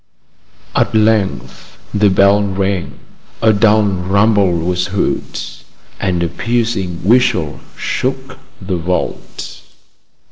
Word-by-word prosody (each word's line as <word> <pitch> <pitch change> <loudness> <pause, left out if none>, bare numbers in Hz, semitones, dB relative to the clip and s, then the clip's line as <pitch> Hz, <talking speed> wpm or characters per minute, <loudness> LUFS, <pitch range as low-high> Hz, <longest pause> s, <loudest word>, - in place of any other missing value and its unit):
At - - +1
length 105 - 0 0.2
the 105 0 +4
bell 100 +2 +4
rang. 95 -2 -2 0.4
A 110 -1 +4
dull 105 +1 +4
rumble 100 +1 +2
was 90 +2 -1
heard, 100 0 -2 0.6
and 90 -3 0
a - - +1
piercing 110 -6 -2
whistle 115 - +2 0.2
shook 130 0 -3 0.2
the 95 -2 -3
vault. 90 +2 -4
100 Hz, 100 wpm, -16 LUFS, 90-110 Hz, 0.6 s, the